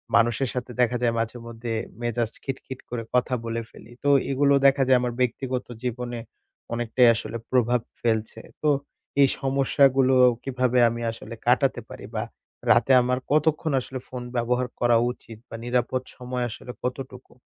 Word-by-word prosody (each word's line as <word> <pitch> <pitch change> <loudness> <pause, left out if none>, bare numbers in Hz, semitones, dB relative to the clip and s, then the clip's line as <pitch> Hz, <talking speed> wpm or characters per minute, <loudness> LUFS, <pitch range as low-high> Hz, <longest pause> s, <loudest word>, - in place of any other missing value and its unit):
মানুষের 120 +2 +3
সাথে 125 -1 -4
দেখা 125 0 +2
যায় 115 -1 +3
মাঝেমধ্যে 115 0 -4 0.3
মেজাজ 120 -1 0
খিটখিট 130 -1 -6
করে 120 -1 -3
কথা 125 +1 +2
বলে 115 0 -2
ফেলি। 115 - -15
তো 145 - +2 0.2
এগুলো 140 +1 +3
দেখা 135 0 +4
যায় 130 -1 +6
আমার 120 -1 -1
ব্যক্তিগত 125 +1 -1 0.2
জীবনে 120 -1 -3 0.5
অনেকটাই 120 +1 +3
আসলে 115 - -4
প্রভাব 125 -1 +3 0.2
ফেলছে। 110 -2 -1 0.2
তো 150 - +2 0.5
এই 140 - +7
সমস্যাগুলো 135 -1 +3 0.3
কিভাবে 125 -2 +1
আমি 120 +1 -5
আসলে 115 - -9
কাটাতে - - +3
পারি - - -9
বা - - 0 0.5
রাতে 135 - +4
আমার 125 +1 0
কতক্ষণ 155 +1 +2
আসলে 130 +1 -6
ফোন 125 -1 -6
ব্যবহার 125 +1 0
করা 120 -1 +4
উচিত 115 -3 -12
বা - - -7
নিরাপদ 125 +1 0
সময় 125 -1 -4
আসলে 125 +2 -8
কতটুকু? 125 0 -6
125 Hz, 150 wpm, -25 LUFS, 120-130 Hz, 0.5 s, এই